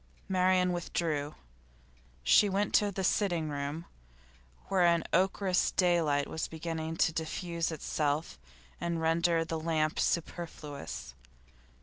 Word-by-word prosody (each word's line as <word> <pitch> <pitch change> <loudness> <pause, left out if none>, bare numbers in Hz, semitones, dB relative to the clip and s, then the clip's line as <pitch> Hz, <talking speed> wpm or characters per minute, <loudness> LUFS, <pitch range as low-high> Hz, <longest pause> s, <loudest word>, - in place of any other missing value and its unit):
Marian 185 -1 +3
withdrew. 155 -4 -2 0.9
She 205 - +5
went 200 +1 0
to 205 -1 +4
the 190 0 -3
sitting 175 -5 +1
room, 145 +3 -4 0.8
where 190 -2 +2
an 170 -1 +4
ochreous 190 +1 +2
daylight 165 -6 +2
was 160 - -3
beginning 160 0 -4
to 160 - +2
diffuse 165 +1 -2
itself 150 0 -2 0.4
and 170 0 -1
to - - -2
render 165 +1 +2
the 160 0 -3
lamp 155 -1 0
superfluous. 150 - -3
165 Hz, 115 wpm, -31 LUFS, 155-180 Hz, 0.9 s, She